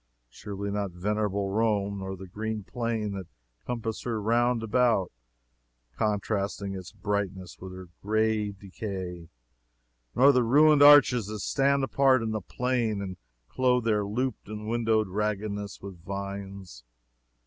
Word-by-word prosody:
Surely 100 +4 -5
not 100 -1 -1
venerable 100 +2 -1
Rome 100 -2 0
nor 95 0 -5
the 95 - -9
green 110 +3 -4
plain 115 -1 -2
that 95 -3 -6 0.4
compasses 115 -2 -3
her 115 -3 -2
round 120 +2 +2
about, 115 -4 +2 0.8
contrasting 100 -1 -1
its 95 -2 -7
brightness 100 -3 -3
with 95 0 -8
her 95 0 -9
gray 110 0 +1
decay 95 -3 -7 0.9
nor 135 +3 +7
the 125 -2 +3
ruined 145 +5 +5
arches 140 -6 +7
that 105 -1 -5
stand 140 +2 +2
apart 135 -2 +3
in 110 - -2
the 110 -1 -2
plain 120 0 -1
and 95 -2 -5 0.3
clothe 125 -1 +2
their 105 -2 +2
looped 120 +4 -3
and 105 0 -6
windowed 110 -2 +1
raggedness 105 +1 -3
with 95 -4 -9
vines. 100 -7 -6
105 Hz, 135 wpm, -28 LUFS, 100-115 Hz, 0.9 s, nor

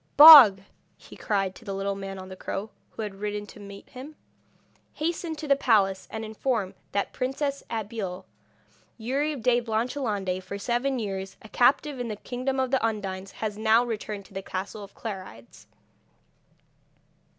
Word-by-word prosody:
'Bog,' 280 -11 +11 0.4
he - - -14
cried, 195 -3 -1
to 230 - -15
the 200 -3 -5
little 195 +1 -2
man 195 0 -6
on 185 0 -9
the 190 - -9
crow, 205 +3 -5 0.2
who 220 - -6
had 210 -2 -5
ridden 210 0 -3
to 210 - -14
meet 200 -1 -11
him. 270 +4 -10 0.8
'Hasten 330 +1 -3
to 305 0 -7
the 280 - +5
palace 200 -8 +2
and 220 0 -5
inform 220 -3 -2 0.2
the 200 - 0
Princess 275 +2 -2
Abeille 210 -4 -4
that - - -28 0.8
Youri 285 +5 0
de 245 -1 +2
Blanchelande, 220 -5 -2
for 200 - -6
seven 245 +5 -1
years 195 -4 -5
a 220 - -12
captive 270 +3 +2
in 245 - -3
the 215 - -4
kingdom 255 +5 -3
of 260 -1 0
the 265 - +1
Undines, 195 -3 -3
has 215 -1 -4
now 225 +2 +4
returned 210 -3 -5
to 195 - -18
the 195 - -4
castle 195 +2 -6
of 200 - -13
Clarides.' 185 - -9
220 Hz, 165 wpm, -26 LUFS, 195-255 Hz, 0.8 s, Bog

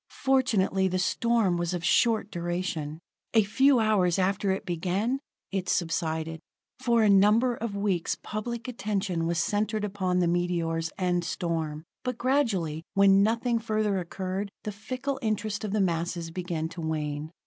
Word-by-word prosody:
Fortunately 225 -8 +2
the 185 0 -1
storm 210 0 +2
was 175 +1 -1
of 170 -1 -4
short 220 +2 +3
duration; 170 -3 -3 0.4
a 220 - +7
few 265 +6 +4
hours 200 -6 +3
after 195 +1 +1
it 190 +1 -1
began, 190 +9 -1 0.3
it 190 -2 -2
subsided. 165 -1 -1 0.4
For 235 -3 +3
a - - +5
number 210 +5 +5
of 230 -3 -4
weeks 200 -4 0
public 230 +2 -4
attention 195 -8 -2
was 170 0 0
centered 210 +5 0
upon 190 -3 -1
the 180 -1 +3
meteors 170 -2 0
and 180 -2 +1
storm; 165 -4 -2 0.2
but 250 -2 -2
gradually, 225 - +1
when 195 0 +6
nothing 230 +3 +1
further 215 -3 0
occurred, 190 +3 -4
the 210 - -3
fickle 255 +6 -4
interest 215 -1 -1
of 210 - -3
the 215 - +1
masses 170 -1 -1
began 170 -2 -3
to 170 0 -8
wane. 150 -1 -3
195 Hz, 150 wpm, -28 LUFS, 170-215 Hz, 0.4 s, a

